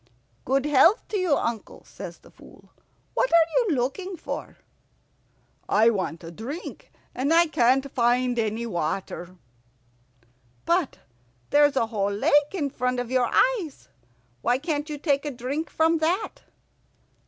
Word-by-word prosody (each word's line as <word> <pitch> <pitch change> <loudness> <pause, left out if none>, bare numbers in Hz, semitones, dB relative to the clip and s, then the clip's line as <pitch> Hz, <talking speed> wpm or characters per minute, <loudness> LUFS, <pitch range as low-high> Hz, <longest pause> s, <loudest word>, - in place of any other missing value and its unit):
"Good 270 +2 +1
health 295 - +4
to 425 - -1
you, 350 -6 +2
uncle," 230 -2 -4
says - - -9
the - - -20
Fool. - - -18 0.4
"What - - +1
are 335 -1 +4 0.2
you 315 - +2
looking 340 +10 -3
for?" - - -6 1.1
"I 220 +3 +5
want 185 -5 -3
a 165 - -8
drink, 265 - -8 0.2
and 270 +4 -1
I 335 +1 +6
can't 265 -2 +2
find 245 0 +1
any 220 +1 -1
water." 175 -1 -4 1.3
"But 345 -4 +1 0.5
there's 290 0 +4
a 230 - +2
whole 205 -3 -1
lake 200 +6 0 0.2
in 290 -6 -2
front 250 -2 -1
of 245 0 -4
your 255 -2 +2 0.3
eyes. 315 -7 -9 0.5
Why 245 +1 +2
can't 295 +1 -3
you 300 - -4
take 280 -2 0
a 295 - -3
drink 270 +5 -4
from 320 +1 +2
that?" 355 +7 -2
270 Hz, 140 wpm, -25 LUFS, 235-315 Hz, 1.3 s, I